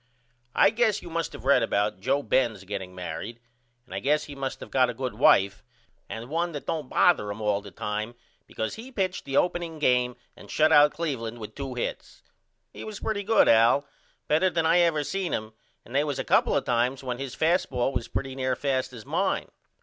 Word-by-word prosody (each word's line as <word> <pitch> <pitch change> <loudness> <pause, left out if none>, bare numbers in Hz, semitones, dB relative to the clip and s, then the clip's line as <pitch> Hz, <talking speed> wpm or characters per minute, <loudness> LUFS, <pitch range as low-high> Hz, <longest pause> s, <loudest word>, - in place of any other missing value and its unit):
I - - +6
guess 225 -3 +1
you 175 - -9
must 165 0 -2
of - - -11
read 135 -2 +5
about 105 -3 0
Joe 135 +8 0
Benz 115 -7 +1
getting 95 -2 -6
married 90 +6 -6 0.5
and - - -12
I - - -2
guess 150 +3 +1
he 145 - -9
must 135 -1 -5
of - - -12
got 130 -1 +3
a - - -4
good 130 0 -3
wife 100 0 +4 0.5
and 115 +1 -6
1 170 +4 -1
that 145 - -6
don't 150 -5 -3
bother 140 -13 +3
him 100 +2 -5
all 105 -2 0
the 100 - -10
time 105 +4 -4 0.3
because 110 - -4
he 240 +4 -9
pitched 190 -6 -2
the 135 0 -1
opening 175 -2 0
game 125 -4 +2 0.2
and - - -14
shut 155 +1 +3 0.2
Cleveland 125 -9 -4
out - - -12
with 105 0 -7
2 135 -1 -6
hits. 120 - -5 0.5
He - - -8
was 215 -2 -7
pretty 215 -2 -2
good 220 +2 +4
Al, 115 +5 +5 0.4
better 160 +5 +3
than 165 -2 0
I 165 +2 +4
ever 165 -4 +3
seen 190 +3 -2
him 110 0 -3 0.3
and 120 - -13
they 140 +2 +3
was 145 -3 -2
a - - -2
couple - - +3
of - - 0
times 125 +3 0
when 125 -1 -4
his 135 -2 -5
fast 170 +3 +2
ball 125 +1 0
was 115 - -2
pretty 135 -1 -4
near 130 -1 -1
as - - -5
fast 130 -2 -1
as 115 -3 -10
mine. - - -1
130 Hz, 220 wpm, -26 LUFS, 115-160 Hz, 0.5 s, I